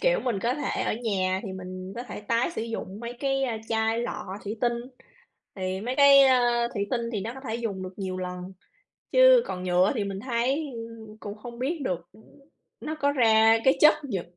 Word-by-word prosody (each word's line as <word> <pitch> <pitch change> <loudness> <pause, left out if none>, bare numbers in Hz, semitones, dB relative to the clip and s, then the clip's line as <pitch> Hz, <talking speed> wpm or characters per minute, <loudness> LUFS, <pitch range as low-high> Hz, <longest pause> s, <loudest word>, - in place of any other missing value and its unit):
kiểu, - - +2
mình 240 -6 -1
có 240 +2 0
thể 290 -1 -2
ở - - 0
nhà 190 -3 0
thì 195 -4 -6
mình 185 0 -7
có 240 - -4
thể - - -8
tái 230 +7 0
sử 225 - -4
dụng 215 -3 -6
mấy 240 +1 -6
cái 270 -1 0 0.3
chai 225 0 +1
lọ 200 -4 -4
thủy 210 +2 -4
tinh. 240 -1 +2 0.8
Thì 185 -1 -3
mấy 245 +5 -3
cái, 280 -1 +8
ơ, 240 -3 +3
thủy 200 -2 -1
tinh 245 -2 0
thì 205 - -2
nó 230 +5 -5
có 265 - -9
thể 220 - -2
dùng 205 -5 -4
được 185 0 -7
nhiều 190 -2 -3
lần, 180 0 -6 0.6
chứ - - +7
còn 180 0 -5
nhựa 180 +2 +3
thì 210 - -1
mình 195 -1 -5
thấy 260 +5 0 0.5
cũng 205 0 -7
không 235 +1 -9
biết 300 +6 -2
được 175 -5 -3 0.7
nó 310 - -4
có 285 -2 +1
ra 225 -3 +5
cái 265 - +5
chất 305 - +8
nhựa 195 -10 -3
225 Hz, 205 wpm, -26 LUFS, 190-260 Hz, 0.8 s, cái